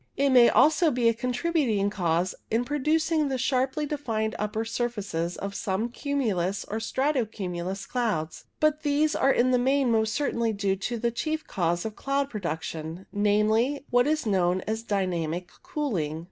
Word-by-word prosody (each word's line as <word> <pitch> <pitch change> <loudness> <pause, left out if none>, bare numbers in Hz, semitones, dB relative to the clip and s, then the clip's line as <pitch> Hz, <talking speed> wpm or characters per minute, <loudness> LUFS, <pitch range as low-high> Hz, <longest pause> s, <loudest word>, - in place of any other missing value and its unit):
It 280 0 +3
may 245 -2 +7
also 315 +2 +4
be 245 -4 +1
a - - +2
contributing 250 -4 0
cause 175 -2 0 0.2
in 230 +2 +1
producing 305 +2 +1
the 265 -1 -1
sharply 265 +3 0
defined 225 -7 -2
upper 210 +1 -2
sur 240 +2 -1
faces 180 -7 -4
of 200 0 -5
some 200 +3 -2
cumulus 220 - -1
or 220 - -3
strato 260 +4 0
cumulus 190 -2 -5
clouds, 215 -11 -2
but 305 0 +2
these 300 +1 +1
are 270 - +3
in 255 0 +3
the 250 - +3
main 265 0 +2
most 220 -1 +1
certainly 235 -6 0
due 200 -1 0
to 235 +5 -3
the 235 +1 0
chief 310 +6 -2
cause 175 0 -1
of 220 -1 -4
cloud 275 0 -1
production 165 -2 -5
— - - -34
namely, 215 +7 +2
what 245 +1 +4
is 310 -2 0
known 185 -3 +2
as 220 +3 -3
dynamic 180 -5 -2
cooling. 175 - -2
225 Hz, 170 wpm, -27 LUFS, 195-275 Hz, 0.2 s, may